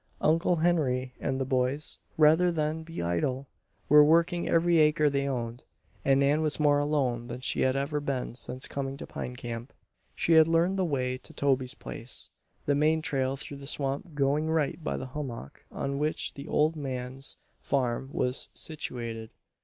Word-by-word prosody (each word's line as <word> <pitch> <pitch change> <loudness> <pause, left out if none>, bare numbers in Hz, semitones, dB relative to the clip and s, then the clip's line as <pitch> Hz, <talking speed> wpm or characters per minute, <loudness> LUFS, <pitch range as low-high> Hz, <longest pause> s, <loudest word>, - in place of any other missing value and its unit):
Uncle 165 +3 +3
Henry 140 -7 +1
and 130 - -1
the 135 - 0
boys, 130 +3 -1 0.2
rather 160 +3 +5
than 155 -1 -1
be 165 - -6
idle, 105 +11 -1 0.4
were 150 0 +8
working 170 +3 +3
every 170 0 +4
acre 150 -1 +4
they 140 0 0
owned, 120 -2 -3 0.4
and 135 0 +4
Nan 145 +3 +3
was 155 -1 -1
more 145 -1 +4
alone 135 -5 0
than 120 0 -6
she - - 0
had 130 0 +2
ever 140 +2 -1
been 140 -5 -3
since 130 +1 -3
coming 135 -1 -4
to - - -7
Pine 125 - -6
Camp. 120 0 -6 0.4
She 165 - +2
had 160 -1 +7
learned 170 +4 +2
the 185 - +2
way 130 -5 -1
to - - -13
Toby's 135 -1 +1
place, 115 +3 -5 0.3
the 145 - +2
main 155 +2 +2
trail 135 -3 0
through 140 +1 -6
the 140 0 -9
swamp 145 +4 -2
going 145 +2 +1
right 160 0 0
by - - -2
the - - -5
hummock 120 - -6
on 140 0 -3
which 150 +1 -1
the 140 - -9
old 155 +2 +2
man's 130 -2 -4 0.2
farm 130 -1 -1
was 125 -1 +2
situated. 115 -7 -3
140 Hz, 175 wpm, -29 LUFS, 130-155 Hz, 0.4 s, were